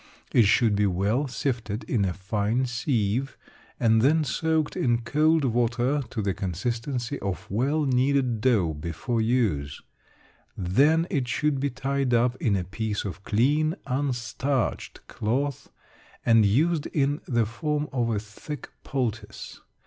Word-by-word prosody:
It 120 - +5
should 110 +1 +3
be 105 0 +2
well 100 +10 0
sifted 120 -4 -3
in 105 -6 0
a 95 - 0
fine 105 +6 -1
sieve, 120 0 -1 0.4
and 110 -1 +4
then 155 +5 +4
soaked 160 +2 0
in 120 -1 +1
cold 155 +4 +2
water 120 +3 +1
to 110 - -3
the 100 -1 0
consistency 115 - -3
of 95 -5 -4
well 140 +9 +1
kneaded 130 -3 +1
dough 105 -10 +2
before 85 - -3
use. 105 - 0 0.8
Then 140 - +3
it 135 -4 0
should 145 +3 0
be 140 +1 0
tied 135 -1 0
up 120 +1 +2
in 105 -6 +1
a 95 - -1
piece 105 +3 -3
of 95 -1 -5
clean, 150 - +2
unstarched 130 -1 -2
cloth, 130 +5 -2 0.6
and 115 -3 +5
used 150 +8 +2
in 145 0 0
the 120 -3 +2
form 150 +6 -2
of 120 -3 0
a 110 - 0
thick 105 +8 -8
poultice. 115 -5 -4
120 Hz, 140 wpm, -26 LUFS, 105-140 Hz, 0.8 s, It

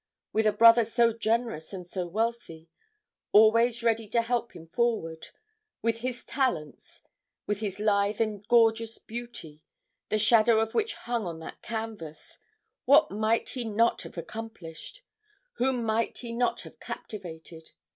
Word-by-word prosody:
With 220 0 +2
a - - +5
brother 230 +2 +7
so 230 +1 +2
generous 225 -6 -1
and 185 -2 -6
so 180 0 -4
wealthy, 195 -5 -3 0.6
always 230 +3 +5
ready 225 -1 +1
to 230 +3 +1
help 235 0 -2
him 165 - -10
forward; 165 -5 -1 0.6
with 230 0 +1
his 245 0 -5
talents; 175 - -3 0.4
with 205 -1 -2
his 205 -2 -4
lithe 205 0 +1
and 215 -3 -1
gorgeous 225 -1 +3
beauty, 230 -10 -9 0.5
the 215 - +1
shadow 220 +1 +5
of 225 0 -1
which 440 -1 0
hung 235 -5 -3
on 165 -1 -5
that - - -9
canvas 220 -9 -7 0.5
what 285 +4 +5
might 215 +3 0
he 250 - -4
not 230 +1 +1
have - - -11
accomplished? 185 - -8 0.5
whom 255 -1 +1
might 220 +1 0
he 240 -2 -7
not 245 +1 0
have - - -13
captivated? 165 -5 -9
225 Hz, 145 wpm, -28 LUFS, 200-235 Hz, 0.6 s, brother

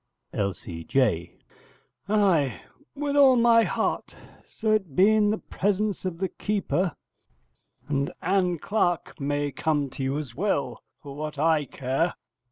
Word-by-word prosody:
L.C.J. 90 0 -1 0.7
Ay, 185 - +2 0.4
with 285 0 -2
all 275 -3 +7
my 235 -1 +5
heart, - - -2 0.3
so 220 -1 -1
it 190 -10 0
be 195 +4 +6
in 210 -1 +3
the 215 - +1
presence 205 0 -1
of 180 -3 -3
the 190 +2 -1
keeper; 190 -4 -1 0.9
and 140 -1 -1
Ann 180 -1 +1
Clark 175 -2 -1
may 145 0 -1
come 145 0 -1
to - - -7
you 135 +2 -1
as 145 -6 -5
well, 140 - -1 0.2
for 140 -2 -8
what 150 0 -5
I 155 0 +2
care. 135 +7 -1
165 Hz, 135 wpm, -26 LUFS, 140-205 Hz, 0.9 s, all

